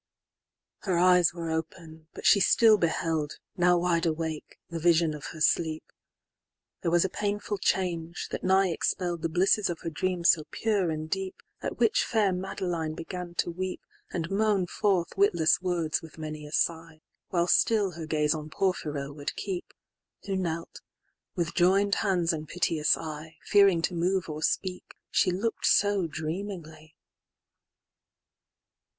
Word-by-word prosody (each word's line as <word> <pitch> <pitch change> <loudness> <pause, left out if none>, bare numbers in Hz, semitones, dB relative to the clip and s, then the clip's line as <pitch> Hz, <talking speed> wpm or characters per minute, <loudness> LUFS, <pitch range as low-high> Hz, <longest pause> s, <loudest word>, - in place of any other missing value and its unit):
XXXIV.Her 185 -4 -1
eyes 180 -1 +5
were 170 -2 -5
open, 160 0 -6
but - - -9
she 200 - +6
still 215 +2 +5
beheld, 160 -3 -1 0.2
Now 180 -1 +4
wide 170 -1 +1
awake, 160 -1 -4
the 170 -1 -5
vision 165 -1 +3
of 150 -1 -8
her 160 - -8
sleep:There 160 +1 -3
was 175 +2 +3
a - - +2
painful 205 +1 -3
change, 175 -3 -1
that - - -4
nigh 190 0 +3
expell'dThe 170 -3 -1
blisses 190 +4 +2
of 170 - -4
her 165 - -4
dream 180 +3 -2
so 160 -2 +4
pure 205 -6 0
and 155 0 -3
deepAt 190 +3 -5
which 465 +3 +3
fair 210 -5 +1
Madeline 180 -4 -3
began 175 +1 -7
to 175 - 0
weep, 185 +2 -4 0.3
And 170 0 -3
moan 205 -2 +2
forth 185 -1 0
witless 175 -4 +3
words 175 -4 -1
with 160 -1 -13
many 155 -1 -6
a - - -12
sigh; 160 0 -1 0.3
While 170 -2 +1
still 205 +1 +3
her 165 -2 -7
gaze 150 -1 +1
on 155 -1 -6
Porphyro 150 -6 -2
would 145 -1 -5
keep; 190 -3 -5 0.5
Who 195 - -2
knelt, 170 -3 -4 0.5
with 170 -2 -2
joined 195 +3 +3
hands 180 -5 +1
and 155 -1 -5
piteous 165 -2 +1
eye, 155 0 -8
Fearing 195 -5 +4
to 180 - 0
move 180 +2 0
or 155 0 -5
speak, 180 +3 -2 0.2
she - - +3
look'd 200 +6 -2
so 200 -3 +3
dreamingly. 160 -1 -6
170 Hz, 145 wpm, -28 LUFS, 160-190 Hz, 0.5 s, she